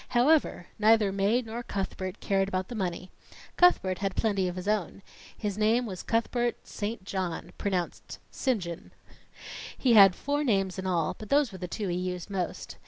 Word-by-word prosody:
However, 280 - +3
neither 215 -1 +4
Mae 200 +6 +1
nor 225 +1 -5
Cuthbert 190 -3 -4
cared 195 -1 +1
about 185 -1 -2
the - - -5
money. 185 -3 -3 0.4
Cuthbert 190 - +4
had 195 -2 -2
plenty 200 -4 +1
of 180 - -4
his 185 +1 -6
own. 205 -2 -1 0.3
His 210 -1 -3
name 225 +3 +3
was 190 -5 -6
Cuthbert 240 +1 0
St. 210 -1 -5
John. 185 -3 -4
(Pronounced 185 -4 -3
Sinjun.) 190 -9 -2 0.9
He 250 -3 +3
had 195 -4 +8
four 290 +1 -1
names 195 -7 +1
in 190 - -3
all, 170 -3 +1
but 215 - -9
those 285 -4 +3
were 190 - -9
the 180 - -4
two 205 +3 -4
he 175 -1 -1
used 180 0 -4
the - - -8
most. 180 -3 -4
200 Hz, 175 wpm, -28 LUFS, 185-225 Hz, 0.9 s, had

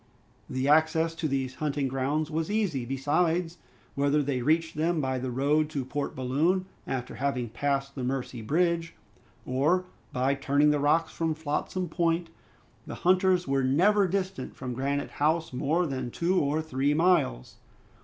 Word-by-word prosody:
The 130 +1 -1
access 160 +2 +3
to 165 -1 -2
these 135 -2 -2
hunting 145 -2 0
grounds 140 +4 -1
was 160 +3 -2
easy; 195 - 0
besides, 165 +6 0 0.3
whether 145 +1 +2
they 135 -2 -1
reached 160 +5 +1
them 165 +2 +1
by 130 -2 -1
the 130 +1 -3
road 145 +5 +1
to 140 -4 -3
Port 140 +2 -3
Balloon, 150 +9 +1 0.2
after 125 -2 -3
having 130 -4 -1
passed 140 +3 -1
the 130 - -5
Mercy 125 -2 -3
Bridge, 165 +6 0 0.5
or 150 +9 +1 0.3
by 130 +2 +1
turning 140 +2 +2
the 150 - +1
rocks 160 +3 +2
from 160 -1 -1
Flotsam 160 +4 -2
Point, 165 +1 0 0.6
the - - -5
hunters 185 0 +3
were 135 0 +1
never 190 +10 +4
distant 185 -6 -3
from 125 -2 -5
Granite 140 +3 -2
House 160 +1 0
more 155 +7 +1
than 130 -4 -3
two 175 +8 +1
or 150 +3 0
three 145 -1 0
miles. 160 - +1
150 Hz, 155 wpm, -28 LUFS, 135-165 Hz, 0.6 s, never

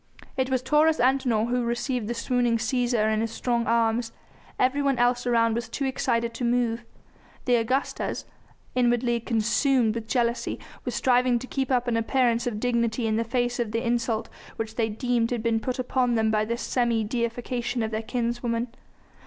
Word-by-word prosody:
It 260 -1 0
was 260 -1 0
Taurus 310 +2 +3
Antinor 245 -3 +2
who 250 0 +1
received 240 -1 -2
the 240 - -2
swooning 240 0 +1
Cæsar 235 -2 +1
in 215 - +1
his 225 - -1
strong 235 +1 -1
arms. 230 0 +1 0.5
Everyone 275 +1 +2
else 245 0 +2
around 230 -1 +3
was 235 +1 -3
too 275 - -3
excited 235 -3 0
to 235 - -5
move. 235 -1 +1 0.6
The 245 -1 +4
Augustas, 260 +5 -2 0.5
inwardly 240 -1 +2
consumed 230 +1 +2
with 225 -1 -5
jealousy, 235 -1 0 0.3
were - - -3
striving 250 -1 +3
to 235 - -6
keep 265 0 -2
up 250 -2 +1
an 235 -1 +1
appearance 240 0 +1
of 215 -3 -2
dignity 235 -1 0
in 220 -1 +1
the 230 - +1
face 245 +1 -1
of 225 -3 -2
the 230 +1 -1
insult 235 -1 0 0.3
which 220 -1 -4
they 225 -1 0
deemed 235 +1 0
had 240 -3 -2
been 230 -1 +2
put 255 +2 -3
upon 250 -1 +1
them 220 -1 +2
by 215 0 +1
this 235 +2 -3
semi 235 -3 +1
deification 240 +1 -2
of 220 - -2
their 220 0 -2
kinswoman. 235 0 -2
240 Hz, 180 wpm, -26 LUFS, 230-250 Hz, 0.6 s, The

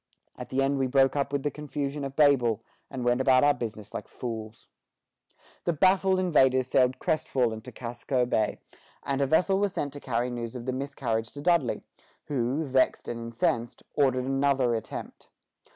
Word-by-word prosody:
At - - -8
the 135 +1 +1
end 135 0 +1
we 135 - +1
broke 135 +1 +3
up 140 -1 0
with 140 -1 -1
the 145 - 0
confusion 145 0 -4
of 135 0 -5
Babel, 125 -7 +3 0.3
and 130 -3 -5
went 120 +1 +2
about 130 0 +5
our 145 0 +5
business 110 -4 -6
like - - -5
fools." 110 -2 -7 1.0
The 170 - +1
baffled 190 +3 +3
invaders 130 -8 +3
sailed 125 0 +2
crestfallen 120 -7 0
to 125 - -10
Casco 125 +2 -2
Bay, 110 -3 0 0.5
and 140 0 -1
a 140 - +2
vessel 185 +6 +3
was 200 -2 0
sent 145 -1 -3
to 145 - -8
carry 125 -2 -1
news 120 0 -5
of 120 -1 -6
the 130 - -1
miscarriage 125 -5 -2
to 145 - -7
Dudley, 170 -6 +1 0.4
who, 135 +2 -1
vexed 130 -3 +1
and 120 - -4
incensed, 115 0 -1
ordered 130 -3 +2
another 135 -2 +2
attempt. 110 -1 -6
130 Hz, 175 wpm, -27 LUFS, 120-145 Hz, 1.0 s, about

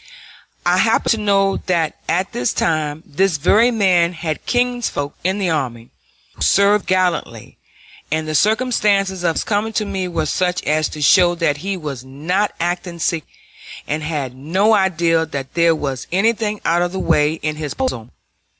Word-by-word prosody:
I - - +3
happened - - +2
to 225 - +2
know 195 -2 +2
that 170 -4 0
at 185 +3 0
this 125 - -1
time 155 -1 -1
this 180 +2 0
very 215 - +4
man 185 -7 +2
had 160 -2 -4
kinsfolk 245 - -1
with 190 +3 0
the 190 -4 0
army, 120 -7 -3 0.4
who - - -18
served 200 +1 +3
gallantly, 185 -2 -1 0.5
and 155 0 -1
the 155 - -3
circumstances 205 - +1
of 165 -2 +1
his - - -1
coming 215 +1 -1
to 215 - 0
me 190 -2 -3
were 165 -3 -2
such 180 +4 -1
as 155 +1 +1
to 150 - -5
show 175 +4 +5
that 165 -4 0
he 195 +5 -3
was 145 -7 -6
not 160 +10 -1
acting 175 0 -3
secretly, 165 -2 -2 0.6
and 155 +1 -2
had 145 -5 -4
no 185 +11 +1
idea 170 -5 +2
that 140 -4 -6
there 170 -1 +3
was 135 -4 -4
anything 210 +2 0
out 170 +1 +2
of 175 0 0
the 190 - -3
way 150 -3 +2
in 155 -1 -4
his 150 -2 -5
proposal. 190 - -3
175 Hz, 170 wpm, -19 LUFS, 155-195 Hz, 0.6 s, show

